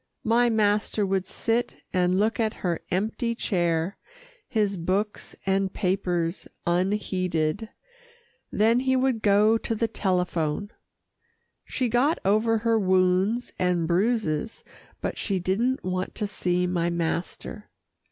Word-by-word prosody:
My 235 +2 +3
master 210 -1 +1
would 190 -1 -1
sit 235 +1 -2
and 180 0 +2
look 220 +4 +1
at 220 -2 0
her 170 -2 0
empty 220 +5 -1
chair, 175 -4 0 0.5
his 210 -5 0
books 190 +4 -2
and 195 0 +1
papers 180 -3 -1 0.2
unheeded, 185 0 0 0.8
then 225 +3 +3
he 260 0 +1
would 255 -3 +1
go 210 +2 +4
to 225 - -2
the 230 +1 0
telephone. 180 -2 -1 0.9
She 255 - -1
got 250 +8 +2
over 215 +3 +3
her 225 0 +2
wounds 185 +4 +2
and 180 -2 +1
bruises, 200 0 0 0.4
but - - -3
she 195 -3 0
didn't 215 +9 0
want 185 0 -3
to 210 - -2
see 180 -3 0
my 175 -1 0
master. 170 +5 -3
200 Hz, 125 wpm, -26 LUFS, 180-225 Hz, 0.9 s, go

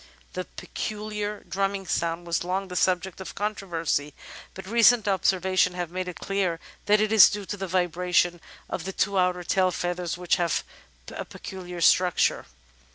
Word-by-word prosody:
The - - -4
pecuhar 210 -1 -5
drumming 195 0 -1
sound 170 -1 -1
was 170 0 -1
long 190 +2 -2
the 180 - -6
subject 185 +1 0
of 190 - -8
controversy, 170 -8 -2 0.4
but 190 - -8
recent 230 +1 +5
observations 190 -2 +2
have 175 -2 -4
made 185 0 -3
it 180 - -7
clear 190 -4 -1 0.3
that 210 +1 +5
it 215 0 +1
is 220 -3 +9
due 205 -1 -5
to 205 - -4
the 195 -1 -5
vibration 175 -1 +1 0.3
of 165 - -4
the 190 - -4
two 195 0 +1
outer 180 -1 +1
tail 185 +1 +2
feathers, 175 -1 -3
which 180 -1 +1
have 170 -2 0 0.5
a - - -5
peculiar 180 -2 -8
structure. 180 +1 +3
185 Hz, 160 wpm, -26 LUFS, 175-195 Hz, 0.5 s, is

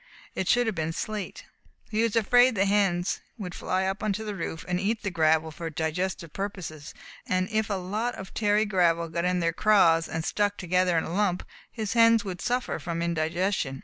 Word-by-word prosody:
It 190 - -3
should 245 0 +4
have 220 - 0
been 160 -1 -2
slate. 210 +2 -5 0.5
He 215 +1 +1
was 230 -1 +1
afraid 245 +2 +5
the 195 0 +2
hens 195 -3 +1 0.2
would 185 -5 -6
fly 185 +1 -1
up 190 +1 -2
onto 215 0 -2
the 210 - -3
roof 165 -3 -5
and 180 0 0
eat 215 +3 -1
the 200 - -2
gravel 160 -1 +2
for 165 +1 -6
digestive 165 +2 -3
purposes, 180 -7 -6 0.3
and 185 0 +1
if 220 -1 0
a 200 - 0
lot 210 +6 -2
of 190 0 -9
tarry 210 0 +2
gravel 170 -4 +2
got 170 +2 -2
in 180 0 +1
their 165 0 +1
craws 165 -5 +4
and 160 0 -3
stuck 205 -1 0
together 180 -1 +1
in 160 - +1
a 165 - -5
lump, 190 -2 0 0.3
his 220 -3 -3
hens 230 -1 +5
would 185 -2 -5
suffer 250 +1 -1
from 170 -1 -3
indigestion. 170 -3 -1
185 Hz, 200 wpm, -27 LUFS, 170-210 Hz, 0.5 s, afraid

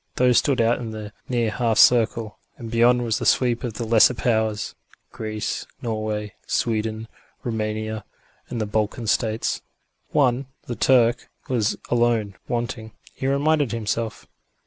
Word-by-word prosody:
Those 125 -2 +5
stood 135 -3 0
out 115 +1 +3
in 115 -2 -5
the 110 -1 -7 0.2
near 120 -3 +1
half 115 -1 0
circle, 115 -2 +4 0.2
and 115 -2 -8
beyond 120 +1 +4
was 115 -2 0
the - - -3
sweep 120 -2 +2
of 120 -4 -4
the 115 - -3
lesser 115 +2 +5
powers: 110 -3 0 0.4
Greece, 110 -1 -4
Norway, 110 -2 -3
Sweden, 110 -1 -1 0.4
Roumania 110 -1 -3 0.5
and 120 - -4
the 110 - 0
Balkan 110 +3 -1
States. 110 +1 0 0.5
One, 130 -2 +2 0.2
the 120 - -4
Turk, 120 -1 +3 0.2
was 115 -4 0
alone 115 -4 +2
wanting, 115 -2 -3 0.2
he 135 - -3
reminded 145 -2 +2
himself. 115 0 -3
115 Hz, 140 wpm, -23 LUFS, 110-120 Hz, 0.5 s, Those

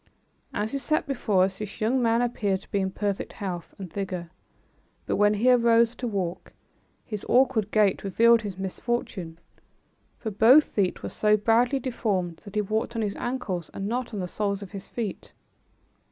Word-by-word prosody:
As 210 +2 -2
he 275 - -2
sat 305 +4 0
before 215 -9 +1
us 190 0 -1
this 210 -2 -7
young 245 +4 +1
man 230 0 +3
appeared 205 -5 -1
to - - -20
be 200 - +1
in 190 -1 0
perfect 200 0 -3
health 180 -4 -6
and 185 -4 -8
vigor, 180 -4 -4 0.7
but - - -1
when 205 0 +4
he 240 +5 +4
rose 235 -1 +4
to 245 - -4
walk, 190 -6 -3 0.5
his 210 -3 -5
awkward 245 -5 +3
gait 210 -3 +2
revealed 230 +4 +4
his 200 -4 -6
misfortune, 190 -3 -3 0.8
for 220 - -4
both 235 +9 +7
feet 195 -9 -1
were - - -3
so 210 0 +3
badly 235 +5 +3
deformed 200 -9 -2
that 200 0 -10
he 210 - +3
walked 220 +3 -2
on 225 - 0
his 205 -1 -2
ankles 205 -9 -3
and 195 - -3
not 245 +2 -2
on 210 - -4
the 180 - -2
soles 200 +1 -2
of 195 - -11
his 195 -2 -8
feet. 220 -5 -5
210 Hz, 180 wpm, -26 LUFS, 195-235 Hz, 0.8 s, both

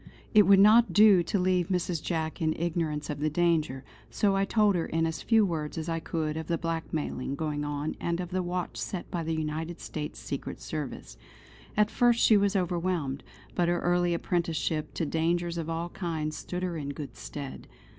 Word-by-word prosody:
It 210 -2 +7
would 200 0 +8
not 220 +4 +6
do 205 -3 +7
to 185 - -1
leave 180 -2 +2
Mrs. 180 -3 -1
Jack 160 -2 -3
in 155 -1 +1
ignorance 160 -3 -2
of 145 - -5
the 155 +1 +1
danger, 155 -5 +1 0.3
so 200 -2 +1
I 195 0 +2
told 210 -1 +3
her 170 -3 -1
in 165 0 0
as 160 -1 -3
few 225 -2 +4
words 160 -4 -3
as 160 0 -3
I 165 0 -1
could 155 -1 -2
of 160 -1 -5
the 170 - 0
blackmailing 160 -5 -3
going 150 -1 -2
on 145 +1 -2
and 170 0 -1
of 180 0 -4
the 185 0 0
watch 180 0 -3
set 185 - -5
by 175 -2 -2
the 165 0 -2
United 160 +2 -3
States 150 -1 -5
Secret 140 - -5
Service. 145 - -6 0.6
At 210 0 +3
first 240 -1 +3
she 220 - +6
was 200 0 +3
overwhelmed; 175 -6 -1 0.3
but 175 - +1
her 175 0 +1
early 175 0 +2
apprenticeship 165 -3 -1
to 165 - -1
dangers 170 +2 0
of 165 0 -4
all 165 +1 -2
kinds 160 -4 -3
stood 180 +3 -5
her 175 -2 -2
in 145 -2 -4
good 145 -1 -7
stead. 140 -2 -7
170 Hz, 195 wpm, -28 LUFS, 155-180 Hz, 0.6 s, would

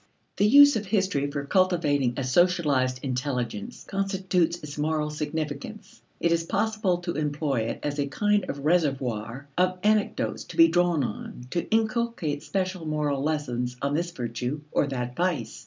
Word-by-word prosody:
The 205 - +4
use 285 +4 +8
of 210 -2 -2
history 190 -9 +1
for 140 0 -4
cultivating 150 -8 +2
a 135 - -1
socialized 135 -4 +2
intelligence 135 - -3
constitutes 190 -3 0
its 150 -1 -7
moral 150 0 -1
significance. 150 +6 -5 0.2
It 170 - +1
is 165 0 +2
possible 215 +1 0
to 175 -1 -3
employ 145 -5 -1
it - - -5
as 145 0 -2
a 140 - 0
kind 205 +7 +1
of 140 0 -5
reservoir 135 -6 0
of 185 0 +2
anecdotes 210 0 +1
to - - -11
be 330 0 +8
drawn 175 -4 +2
on 120 +2 -6
to 170 - -2
inculcate 220 -9 0
special 185 -2 -2
moral 150 -3 0
lessons 125 -5 -2
on 140 +2 -1
this 170 +3 0
virtue 125 0 -4
or - - +2
that 125 -2 -4
vice. 180 -3 -1
155 Hz, 155 wpm, -26 LUFS, 140-185 Hz, 0.2 s, use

